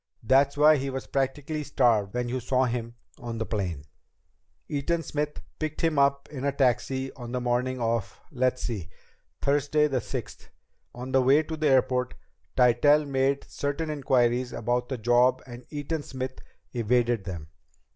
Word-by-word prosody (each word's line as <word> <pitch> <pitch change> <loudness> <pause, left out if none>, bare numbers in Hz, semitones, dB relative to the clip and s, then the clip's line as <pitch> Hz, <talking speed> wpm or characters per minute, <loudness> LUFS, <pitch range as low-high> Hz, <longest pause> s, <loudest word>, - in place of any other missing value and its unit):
That's 135 +4 +3
why 150 +1 +6
he 135 0 -2
was 135 0 -4
practically 140 +3 -2
starved 115 -7 +2
when 125 0 -1
you 130 +2 -2
saw 130 +1 +1
him 120 -1 -3 0.2
on 120 -3 -5
the 110 - -2
plane. 90 -10 -3 0.8
"Eaton 165 +4 -1
Smith 150 0 -3 0.2
picked 155 -1 -3
him 160 -3 +2
up 140 0 +2
in 135 -3 -6
a 140 - +2
taxi 130 0 0
on 120 -2 -8
the 125 - -1
morning 125 +1 0
of 115 -2 -1
let's 130 -2 0
see 100 -8 -4 0.5
Thursday 145 +2 +2
the 130 -4 -1
sixth. - - -7 0.5
On 125 +2 -6
the 130 - +4
way 135 +5 +5
to 160 +1 -5
the 155 -1 0
airport, 130 -1 +2 0.4
Tytell 135 +5 +5
made 135 0 +1
certain 150 +2 -3
inquiries 125 -3 +1
about 120 +2 -1
the 130 - -2
job 120 +3 +3
and 120 -1 -11
Eaton 150 +1 -3
Smith 130 -2 -6 0.3
evaded 120 -2 +1
them. 85 -5 -6
130 Hz, 160 wpm, -27 LUFS, 120-140 Hz, 0.8 s, why